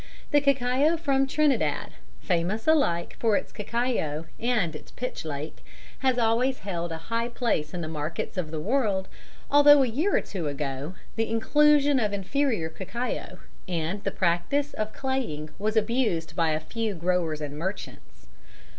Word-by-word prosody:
The 290 - +5
cacao 280 +3 +3
from 275 -4 +1
Trinidad 270 - +1 0.3
(famous 180 +6 0
alike 275 - +2
for 225 -3 +3
its - - -5
cacao 210 -9 -1
and 220 -9 +1
its - - -10
pitch 250 - -5
lake) 150 0 -6 0.4
has 260 -2 +2
always 245 +3 +2
held 175 -3 -3
a 165 - -3 0.2
high 230 +1 +1
place 225 -12 -1
in 175 - -4
the 160 - -4
markets 155 +1 -4
of 180 -5 -2
the 155 0 -4
world, 200 - 0 0.4
although 290 0 +8
a - - +1
year 300 - +1
or - - +2
two 175 -6 -4
ago 140 +3 -4 0.2
the 225 0 0
inclusion 290 +4 +4
of 210 -3 0
inferior 215 - 0
cacao 215 +9 -4 0.3
and 175 +3 -2
the - - 0
practice 190 +12 0
of 215 0 -3
claying 235 - -3
was 215 +2 0
abused 215 -9 0
by 165 -2 +2
a 155 0 +1
few 215 +6 -3
growers 170 -2 0
and 145 -1 -5
merchants. 190 - -6
215 Hz, 155 wpm, -27 LUFS, 165-260 Hz, 0.4 s, although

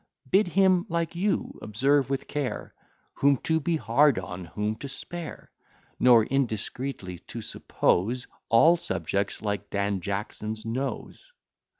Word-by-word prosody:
Bid 195 0 +5
him 185 +2 +3
like 170 -1 -1
you, 195 +4 -1
observe 135 +6 +2
with 135 -1 -2
care, 145 -3 -3 0.4
Whom 140 0 +3
to 160 0 +2
be 165 +2 0
hard 130 +2 +4
on, 90 -1 -5
whom 105 +5 -2
to 140 - -6
spare; 170 +4 -7 0.5
Nor 120 -3 +7
indiscreetly 125 -6 -2
to - - -6
suppose 120 +8 0 0.2
All 160 +10 +6
subjects 100 -11 -2
like 105 -1 -2
Dan 100 -1 -1
Jackson's 105 +3 -4
nose. 130 - -4
125 Hz, 125 wpm, -27 LUFS, 105-155 Hz, 0.5 s, Nor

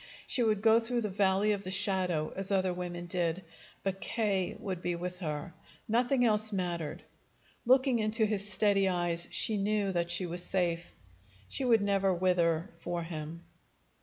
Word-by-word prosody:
She 250 - +1
would 215 -3 +1
go 225 0 +6
through 240 +1 -1
the 210 - -2
valley 195 +1 +2
of 200 -1 -2
the 185 - -5
shadow, 185 -5 +1
as 195 +1 -1
other 190 -2 +1
women 175 -1 -5
did; 175 0 -1 0.4
but 195 0 -3
K. 200 -5 -1
would 185 -4 -5
be 175 -1 -1
with 180 +1 -5
her. 155 0 -4 0.3
Nothing 245 +3 +2
else 215 -1 +2
mattered. 170 -4 -3 0.6
Looking 260 -1 +4
into 215 +1 +2
his 205 -1 +1
steady 195 0 +3
eyes, 175 -1 0
she 220 - +2
knew 205 0 0
that 170 -2 -1
she 180 +2 0
was 175 0 -5
safe. 175 -2 -2 0.5
She 265 - -1
would 230 -3 +4
never 195 -1 +2
wither 175 -2 +1
for 175 0 -3
him. 165 0 -7
190 Hz, 165 wpm, -30 LUFS, 175-210 Hz, 0.6 s, go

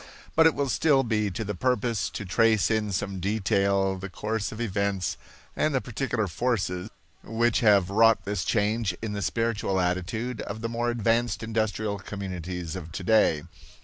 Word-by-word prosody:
But 160 0 +7
it 160 - +2
will 140 0 0
still 135 0 +3
be 105 -3 0
to 100 +4 -4
the 105 0 -3
purpose 125 0 0
to 105 - -6
trace 110 +3 +3
in 110 -1 0
some 95 0 -2
detail 100 -1 +1
the 95 +1 -6
course 105 +2 -3
of 110 - -8
events 100 -5 -1 0.4
and 155 -2 +1
the - - +3
particular 120 -2 -2
forces 95 -2 -1 0.3
which 115 +1 +1
have 100 -5 +4
wrought 115 +2 +4
this 100 -2 -2
change 105 -3 0
in 110 -2 -3
the 100 - -3
spiritual 110 -4 0
attitude 95 +7 -2
of 110 - -6
the 115 - -2
more 120 +1 -1
advanced 115 0 +1
industrial 110 -2 -1
communities 90 -3 -5
of 85 -3 -7
today. 90 -4 +2
105 Hz, 165 wpm, -27 LUFS, 95-115 Hz, 0.4 s, But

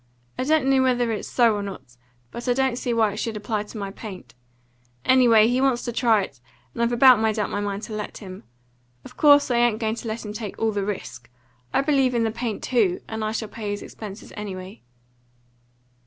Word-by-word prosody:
I 255 - -2
don't 310 -1 +2
know 270 -1 +4
whether 245 -2 +2
it's 215 - -4
so 235 -3 +3
or 205 - -2
not; 140 -11 -8 0.4
but 240 +2 -7
I 245 - +4
don't 265 -1 +1
see 245 0 -3
why 220 -3 +2
it - - -8
should 225 -1 -3
apply 210 0 -2
to 215 - -10
my 200 -1 -4
paint. 195 -2 -10 0.7
Anyway, 235 -4 +6
he 250 +2 +1
wants 265 -3 +2
to 240 - -3
try 225 -4 +3
it, 140 -8 -10 0.3
and - - -4
I've 235 0 +2
about 245 -1 +7
made 220 0 +1
up 210 - -1
my - - -2
mind 205 +1 -3
to 220 - -7
let 210 -1 -5
him. 185 - -10 0.6
Of 250 - -12
course 290 -3 +5
I 240 - +2
ain't 240 -2 +3
going 220 -1 -1
to 235 - -7
let 220 +1 -4
him 210 - -6
take 210 -2 -6
all 225 0 +1
the 205 -1 -2
risk. 125 - -6 0.4
I - - +2
believe 270 -3 +2
in 235 - +2
the 225 - 0
paint 235 -1 -4
TOO, 210 -8 +1
and 220 0 -4
I 215 - -1
shall 220 0 -3
pay 210 0 -6
his 205 0 -4
expenses 210 -1 -10
anyway." 195 -1 -7
225 Hz, 225 wpm, -24 LUFS, 205-245 Hz, 0.7 s, about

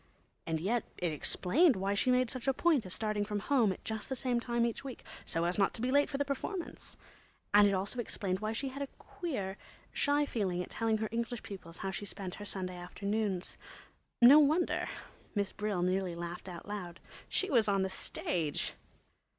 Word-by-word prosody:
And 160 -1 0
yet 220 +7 +1
it 175 -2 0
explained 245 - +4
why 195 +1 0
she 200 +5 +2
made 250 -1 +3
such 255 0 -5
a 270 - +3
point 300 - +3
of - - -10
starting 215 +1 0
from 210 0 -2
home 225 -1 +3
at 185 - -7
just 220 +2 -3
the 265 - -1
same 250 -1 +1
time 235 0 +1
each 235 +3 -2
week—so 240 -9 -5
as 175 +3 0
not 195 - +3
to - - -5
be 255 - +1
late 285 +1 +4
for 275 - -2
the 285 - +1
performance—and 280 - -1
it 200 - +2
also 200 +6 -2
explained 190 -5 -2
why 215 +1 -1
she 265 +5 -2
had 270 +2 -7
quite 280 -1 -3
a - - -33 0.2
queer, 210 - -2 0.4
shy 290 +1 +3
feeling 190 -9 -1
at - - -11
telling 225 -1 +1
her 215 0 -2
English 235 0 -2
pupils 180 -5 -9
how 195 - -3
she 205 - -5
spent 195 -2 -5
her - - -5
Sunday 185 -2 -4
afternoons. 200 +1 -2 0.6
No 260 +5 +10
wonder! 310 +4 +3 0.5
Miss 200 -2 0
Brill 210 -4 -1
nearly 185 -1 0
laughed 175 +2 -6
out 175 +1 -8
loud. 185 -5 -5 0.3
She 385 - 0
was 230 -4 +4
on 195 -1 +3
the 190 - -1
stage. 165 -4 -2
210 Hz, 200 wpm, -33 LUFS, 190-250 Hz, 0.6 s, No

